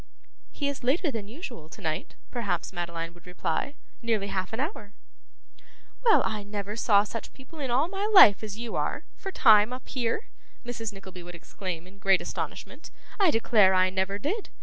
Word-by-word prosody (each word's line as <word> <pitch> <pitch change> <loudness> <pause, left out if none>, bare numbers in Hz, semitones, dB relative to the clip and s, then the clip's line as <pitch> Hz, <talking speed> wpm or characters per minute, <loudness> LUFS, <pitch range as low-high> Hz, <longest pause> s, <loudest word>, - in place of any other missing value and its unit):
'He 285 - -2
is 280 -2 -4
later 290 +6 +2
than 220 -5 -5
usual 235 - -8
to - - -12
night,' 155 +2 -3 0.2
perhaps 235 -5 -2
Madeline 170 -1 -4
would 175 +1 -19
reply. 265 +10 -2 0.3
'Nearly 220 -4 0
half 185 -1 -2
an 225 - -4
hour.' 260 - -4 1.1
'Well, 455 -3 +6
I 215 -2 -2
never 205 0 -5
saw 210 -3 +4
such 225 +2 -7
people 275 +4 -13
in 270 -3 -3
all 265 +6 +2
my 395 +3 -2
life 215 - +9
as 210 -1 -6
you 235 -1 -5
are, - - -1
for 385 - -6
time, 215 - +6
up 255 0 -7
here!' 245 - -2 0.4
Mrs. 225 -3 -4
Nickleby 190 -2 -10
would 175 0 -10
exclaim 175 -1 -6
in 195 +2 -17
great 195 -2 +4
astonishment; - - -6 0.3
'I 390 -4 +5
declare 215 -6 +4
I 185 0 +4
never 190 +1 -1
did! 370 - -3
215 Hz, 180 wpm, -27 LUFS, 190-260 Hz, 1.1 s, life